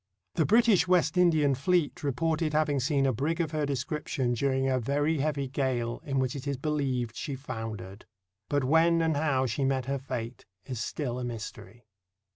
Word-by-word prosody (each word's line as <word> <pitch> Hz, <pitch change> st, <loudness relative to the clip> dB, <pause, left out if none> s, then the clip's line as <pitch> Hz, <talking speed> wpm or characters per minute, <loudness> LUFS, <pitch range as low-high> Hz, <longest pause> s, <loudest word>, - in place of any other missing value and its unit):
The 160 Hz, -, +1 dB
British 225 Hz, -3 st, +4 dB
West 180 Hz, -3 st, +3 dB
Indian 160 Hz, -6 st, +4 dB
fleet 155 Hz, +4 st, 0 dB
reported 155 Hz, +3 st, 0 dB
having 150 Hz, -2 st, +2 dB
seen 135 Hz, +1 st, +1 dB
a 135 Hz, -, +2 dB
brig 155 Hz, +9 st, -1 dB
of 160 Hz, -3 st, 0 dB
her 155 Hz, -2 st, -1 dB
description 140 Hz, -2 st, -2 dB
during 135 Hz, +2 st, +1 dB
a 130 Hz, -1 st, +2 dB
very 145 Hz, +5 st, 0 dB
heavy 140 Hz, -1 st, -1 dB
gale, 125 Hz, -3 st, -1 dB
in 135 Hz, -2 st, -2 dB
which 130 Hz, -1 st, 0 dB
it 140 Hz, 0 st, -6 dB
is 140 Hz, -1 st, -1 dB
beheved 135 Hz, -5 st, -1 dB
she 140 Hz, -4 st, -4 dB
foundered. 110 Hz, -7 st, -7 dB, 0.4 s
But 145 Hz, -1 st, +1 dB
when 165 Hz, +4 st, +4 dB
and 160 Hz, -2 st, +1 dB
how 145 Hz, -3 st, +1 dB
she 130 Hz, +3 st, -1 dB
met 135 Hz, -1 st, +1 dB
her 140 Hz, +1 st, -2 dB
fate 125 Hz, -3 st, -5 dB, 0.2 s
is 125 Hz, -4 st, -4 dB
still 125 Hz, -1 st, -3 dB
a -, -, -4 dB
mystery. 115 Hz, -2 st, -7 dB
140 Hz, 180 wpm, -29 LUFS, 125-155 Hz, 0.4 s, British